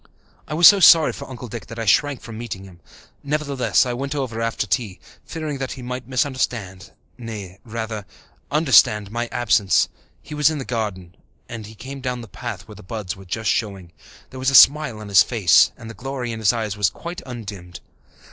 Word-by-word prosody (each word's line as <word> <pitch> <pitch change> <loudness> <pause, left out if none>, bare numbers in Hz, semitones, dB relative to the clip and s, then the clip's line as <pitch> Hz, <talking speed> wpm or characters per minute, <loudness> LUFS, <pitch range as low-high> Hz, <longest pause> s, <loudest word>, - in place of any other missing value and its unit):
I 155 - -4
was 170 +1 +8
so 200 - +8
sorry 165 -3 +7
for 140 - -9
Uncle 125 -1 -8
Dick 115 0 -8
that 115 - -9
I 115 - -3
shrank 140 +5 +2
from 115 -1 -9
meeting 110 -4 -6
him. 95 -3 -14 0.4
Nevertheless, 140 -4 +1
I 125 - -2
went 140 +4 -4
over 125 -5 -3
after 115 -1 -1
tea, 105 -3 -2 0.3
fearing 155 -4 -5
that 135 -1 -4
he 130 - -10
might 125 0 -6
misunderstand, 125 - -2 0.3
nay, 105 -5 -8
rather, 110 -3 -5 0.4
understand, 115 -9 +4
my 120 +1 -2
absence. 105 -8 +2 0.3
He 150 - -11
was 150 0 +3
in 155 - -3
the 135 - -5
garden, 100 -7 -4 0.3
and 115 -3 -8
he 110 - -13
came 135 +5 -9
down 125 -1 -3
the 115 - -10
path 120 +3 -7
where 110 - -11
the 105 - -13
buds 100 -1 -5
were 95 0 -14
just 105 +4 -1
showing. 100 -7 -3 0.4
There 130 - -9
was 130 +1 +1
a 135 - +1
smile 145 -4 +6
on 105 -1 -9
his 100 -1 +7
face 105 -8 +4
and 120 -4 -11
the 115 - -8
glory 125 +2 -5
in 110 - -5
his 110 -2 +4
eyes 110 -4 -3
was 105 -4 +2
quite 170 - -8
undimmed. 100 -8 -8
115 Hz, 205 wpm, -21 LUFS, 105-135 Hz, 0.4 s, was